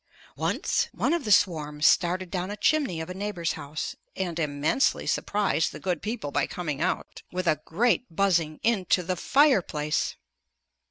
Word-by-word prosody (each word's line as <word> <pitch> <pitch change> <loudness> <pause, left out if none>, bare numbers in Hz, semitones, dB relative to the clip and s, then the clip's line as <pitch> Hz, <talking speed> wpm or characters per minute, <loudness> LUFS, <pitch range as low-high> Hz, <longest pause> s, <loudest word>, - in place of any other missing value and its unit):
Once - - 0
one - - +1
of 330 -9 -1
our - - +1
swarms 155 -6 +2
started 180 +1 +3
down 185 0 -2
a 205 - -5
chimney 270 - +1
of 160 - -4
a 180 - -5
neighbor's 190 -3 -2
house, 150 0 -5 0.2
and 175 -3 -3
immensely 150 - +1
surprised 205 -5 0
the - - -9
good 180 -4 -2
people 215 -9 -4
by 145 -1 +1
coming 155 -5 -4
out, 180 +2 -2
with 185 0 -3
a 155 -3 +2
great 240 +7 +1
buzzing, 165 -4 +1
into 195 -5 +2
the 185 +1 -1
fireplace! 180 - +2
180 Hz, 160 wpm, -27 LUFS, 160-205 Hz, 0.2 s, started